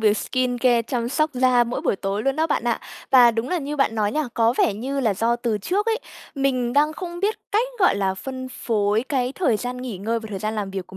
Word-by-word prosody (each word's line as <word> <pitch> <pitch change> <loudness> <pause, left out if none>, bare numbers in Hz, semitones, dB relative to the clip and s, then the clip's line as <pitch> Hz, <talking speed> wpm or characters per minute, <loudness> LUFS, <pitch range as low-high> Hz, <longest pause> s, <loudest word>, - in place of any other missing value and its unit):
việc 215 -1 +3
skincare, 245 0 +1
chăm 235 0 -2
sóc 310 +3 +1
da 250 -1 +4
mỗi 240 +1 -3
buổi - - 0
tối 200 +2 -2
luôn 275 +1 0
đó 320 +1 +2
bạn 290 - -1
ạ. 235 -1 0 0.3
Và 250 -3 +7
đúng 230 +3 -3
là 360 - 0
như 295 0 -4
bạn 275 -5 +2
nói 210 -1 0
nha, 305 -1 0
có 230 0 +3
vẻ 205 - +3
như 270 +6 -3
là 220 -6 +1
do 230 +4 +1
từ 235 -3 -1
trước 395 - -1
ấy, 450 +1 +1 0.4
mình 255 -3 0
đang 300 +2 +3
không 345 +1 -7
biết 420 +2 +1 0.2
cách, 450 +4 +2
gọi 365 - +4
là, 195 -1 0
phân 260 +5 -6
phối 215 -3 0
cái 255 -2 0
thời 310 - +1
gian 245 +3 -4
nghỉ 250 -6 -6
ngơi 225 +3 -1
và 220 - -8
thời 195 - -4
gian 215 +3 -3
làm 205 -3 -3
việc 190 -2 -5
của 190 - -12
245 Hz, 255 wpm, -23 LUFS, 220-275 Hz, 0.4 s, Và